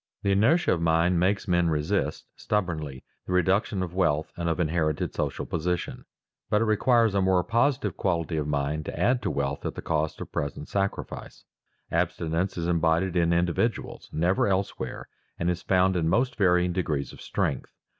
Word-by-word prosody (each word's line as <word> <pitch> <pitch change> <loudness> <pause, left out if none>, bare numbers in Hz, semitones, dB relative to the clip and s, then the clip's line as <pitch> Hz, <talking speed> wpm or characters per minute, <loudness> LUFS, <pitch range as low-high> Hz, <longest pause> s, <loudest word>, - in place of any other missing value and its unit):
The 100 - +2
inertia 125 - +3
of 85 - -2
mind 85 +2 +3
makes 95 +3 +1
men 85 -2 +2
resist 80 +6 -1
stubbornly 80 -10 -2 0.2
the 90 - -2
reduction 95 +2 +2
of 90 -2 -6
wealth 80 -5 +1
and 85 -1 -2
of 85 - -1
inherited 80 -2 0
social - - -2
position; 90 +2 -3 0.4
but 105 - +3
it 115 - +2
requires 115 0 +3
a 100 - +2
more 95 -1 +3
positive 115 - +1
quality 85 -3 -1
of 75 -2 -1
mind 75 +1 -1
to - - -6
add 125 0 +2
to - - -1
wealth 70 0 -2
at - - -3
the - - -5
cost 80 -1 -1
of - - -7
present 75 0 -4
sacrifice. 100 0 -3 0.5
Abstinence 85 +4 -1
is 85 - -2
embodied 85 +2 +1
in 85 -1 +3
individuals, 85 +7 -1
never 90 +6 +1
elsewhere, 95 0 -2 0.3
and 85 +1 0
is 90 0 -4
found 95 0 +2
in 80 -2 +1
most 125 +7 +1
varying 90 -3 +3
degrees 75 -6 -2
of - - -13
strength. - - -2
90 Hz, 175 wpm, -26 LUFS, 80-95 Hz, 0.5 s, inertia